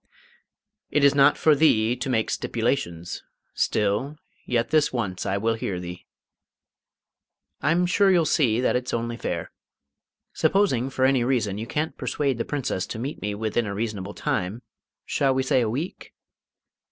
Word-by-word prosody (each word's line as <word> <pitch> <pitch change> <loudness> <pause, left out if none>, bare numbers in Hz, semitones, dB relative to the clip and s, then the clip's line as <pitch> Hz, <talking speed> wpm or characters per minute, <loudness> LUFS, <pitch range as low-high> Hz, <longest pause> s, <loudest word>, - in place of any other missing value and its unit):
"It 150 - +1
is 140 0 +6
not 140 +1 +5
for 155 - +4
thee 120 -6 +3
to 130 +2 -4
make 110 -3 0
stipulations. 100 -8 -2 0.3
Still, 105 +9 0 0.3
yet 120 -1 0
this 155 -2 +3
once 100 -8 -3
I 100 - 0
will 115 +3 +1
hear 100 -5 -3
thee." 90 0 -8 1.5
"I'm 170 +3 +2
sure 195 +3 +3
you'll 175 -4 +4
see 130 -7 +2
that 125 - +2
it's 125 -1 -1
only 115 0 -2
fair. - - -4 0.8
Supposing, 135 - +2
for 130 -1 +1
any 130 -2 +3
reason, 115 -6 0
you 115 - -5
can't 155 +5 -2
persuade 135 -5 -1
the 115 - -1
Princess 130 -10 -2
to - - -6
meet 135 +6 -5
me 105 0 -2
within 110 +1 -1
a 100 - -4
reasonable 105 -2 -4
time 100 +7 -2 0.4
shall 135 -2 +1
we 130 - +1
say 130 -1 +2
a 115 - 0
week? 145 +11 -5
120 Hz, 160 wpm, -25 LUFS, 110-140 Hz, 1.5 s, is